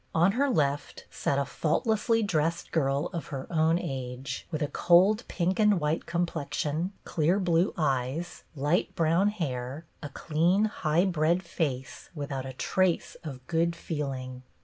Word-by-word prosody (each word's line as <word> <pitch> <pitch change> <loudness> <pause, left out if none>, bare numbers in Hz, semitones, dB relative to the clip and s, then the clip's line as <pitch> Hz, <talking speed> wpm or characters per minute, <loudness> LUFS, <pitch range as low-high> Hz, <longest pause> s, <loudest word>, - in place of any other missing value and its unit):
On 170 +4 +5
her 275 +6 +1
left 145 - -1
sat 140 - -1
a 140 - +1
faultlessly 220 - +1
dressed 165 -3 0
girl 140 -2 0
of 170 - -4
her 135 -2 -5
own 160 +1 +3
age, 130 -3 -5
with 155 -2 -2
a - - 0
cold 185 +9 +4
pink 180 +3 -1
and 210 -3 +4
white 150 +1 -1
complexion, 170 0 -1
clear 170 +5 +1
blue 175 -1 +2
eyes, 140 +3 -1
light 155 +6 0
brown 170 +3 +3
hair, 145 -7 -3 0.2
a 145 - -6
clean, 170 +8 +2
high 175 -4 +1
bred 170 0 +1
face 135 -6 -3
without 140 -3 -4
a 130 - -6
trace 185 +6 0
of 130 -5 -8
good 170 0 +1
feeling. 135 -6 -4
160 Hz, 150 wpm, -28 LUFS, 140-175 Hz, 0.2 s, On